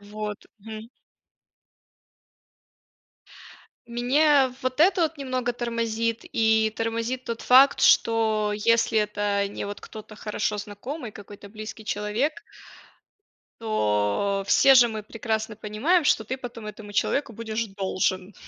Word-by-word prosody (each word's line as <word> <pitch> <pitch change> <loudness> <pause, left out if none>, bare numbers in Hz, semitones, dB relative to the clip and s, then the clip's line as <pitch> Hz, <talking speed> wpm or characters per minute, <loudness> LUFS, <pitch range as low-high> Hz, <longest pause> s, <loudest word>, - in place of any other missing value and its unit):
Вот, 210 0 -7
мгм. 220 +2 -9 3.0
Мне 265 +3 +3
вот 255 +3 -2
это 355 0 +4
вот 320 -2 -1
немного 255 -3 -2
тормозит. 230 -1 -2
И 220 -1 +2
тормозит 230 +3 -3
тот 230 -1 -5
факт, 265 +2 +6
что 220 -2 +3
если 225 +1 +2
это 205 -1 0
не 200 - -6
вот 205 0 -7
кто-то 215 -1 -11
хорошо 210 0 -2
знакомый, 215 +5 -7
какой-то 205 0 -12
близкий 215 +1 -9
человек. 210 +8 -1 1.3
То 195 - 0
все 270 +5 +6
же 245 -2 +7
мы 220 -1 -5
прекрасно 220 0 -3
понимаем, 220 - 0
что 220 -6 +2
ты 260 +5 -4
потом 240 -4 -9
этому 210 0 -9
человеку 255 +4 0
будешь 225 0 -3
должен. 190 -1 -2
220 Hz, 115 wpm, -25 LUFS, 210-245 Hz, 3.0 s, же